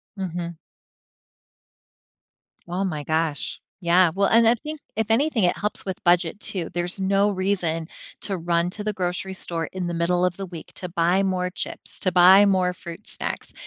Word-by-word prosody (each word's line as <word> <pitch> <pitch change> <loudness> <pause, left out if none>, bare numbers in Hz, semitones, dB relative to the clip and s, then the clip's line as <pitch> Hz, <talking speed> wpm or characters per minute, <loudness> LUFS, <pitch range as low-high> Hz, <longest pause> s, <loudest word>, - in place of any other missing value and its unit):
Mhm. 175 -3 -4 2.1
Oh 180 +3 -1
my 155 -6 -2
gosh, 160 -1 -1 0.2
yeah, 175 0 +4
well 200 +2 +2
and 230 +1 +5
I 235 - +5
think 305 +6 -7 0.2
if 220 -1 0
anything, 260 -1 +2
it 175 - +2
helps 210 +1 -3
with 190 -2 -5
budget 175 0 +3
too, 175 -5 -4
there's 175 +3 -2
no 195 +2 +2
reason 185 -4 -1 0.3
to 195 -2 -3
run 170 0 +1
to 210 +2 -5
the 215 - 0
grocery 185 0 -2
store 165 -3 -3
in 185 -2 -4
the 175 - -3
middle 175 +2 +1
of 180 -1 0
the 195 - -4
week 170 -3 -10
to 180 - -6
buy 175 +3 +2
more 185 -1 0
chips, 180 - -6
to 185 - +1
buy 185 +3 +8
more 185 -2 +2
fruit 170 +3 -10
snacks - - -4
180 Hz, 175 wpm, -24 LUFS, 170-195 Hz, 2.1 s, buy